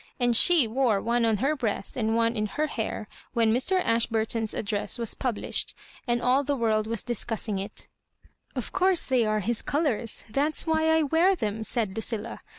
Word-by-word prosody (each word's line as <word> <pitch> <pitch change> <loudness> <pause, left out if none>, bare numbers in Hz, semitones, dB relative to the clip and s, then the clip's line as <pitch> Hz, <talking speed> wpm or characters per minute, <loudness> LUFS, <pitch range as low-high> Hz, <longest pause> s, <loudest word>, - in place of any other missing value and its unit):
And 245 -1 +2
she 320 0 +5
wore 230 -3 +1
one 235 +2 +1
on 220 -2 +2
her 275 +7 +1
breast 220 -7 -2
and 225 -2 0
one 230 0 +2
in 215 -1 -1
her 300 +9 -1
hair 220 -6 -4 0.3
when 225 -2 +3
Mr. 315 +10 +2
Ashburton's 225 -1 0
address 210 +2 -2
was 230 -2 -2
published, 245 -5 -2 0.3
and 240 0 0
all 260 +3 +3
the 285 +1 -1
world 220 -3 +1
was 230 -2 -2
discussing 225 -3 -3
it 200 +3 -7 0.3
" - - -34
Of - - -4
course 370 -2 +3
they 250 -4 +1
are 215 0 0
his 225 +3 -1
colours 280 -7 -1
— - - -25
that 290 +5 +1
is - - +3
why 320 -1 +2
I 320 0 +4
wear 330 +6 +3
them," 220 - -3
said 220 -4 0
Lucilla. 225 0 -2
235 Hz, 195 wpm, -26 LUFS, 220-275 Hz, 0.3 s, she